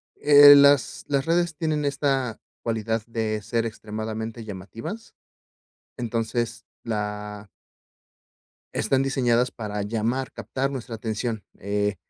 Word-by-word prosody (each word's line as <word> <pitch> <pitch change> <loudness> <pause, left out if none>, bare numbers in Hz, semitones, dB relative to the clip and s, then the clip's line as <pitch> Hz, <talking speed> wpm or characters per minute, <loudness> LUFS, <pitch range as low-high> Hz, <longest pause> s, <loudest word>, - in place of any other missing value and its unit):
eh, 145 0 +9
las 140 -2 +4
las 140 -1 0
redes 170 -1 +1
tienen 155 -3 -1
esta 135 -4 0 0.2
cualidad 115 -1 -1
de 110 -2 -2
ser 115 +2 -1
extremadamente 110 +1 -5
llamativas, 110 - -8 0.8
entonces, 115 0 -2 0.2
la 105 -2 -4 1.2
están 135 -1 +1
diseñadas 125 -2 +2
para 105 -2 -4
llamar 115 +5 -1
captar 130 +5 -3
nuestra 120 -3 -5
atención, 110 -1 -3 0.2
eh, 100 +1 -1
115 Hz, 105 wpm, -25 LUFS, 110-135 Hz, 1.2 s, eh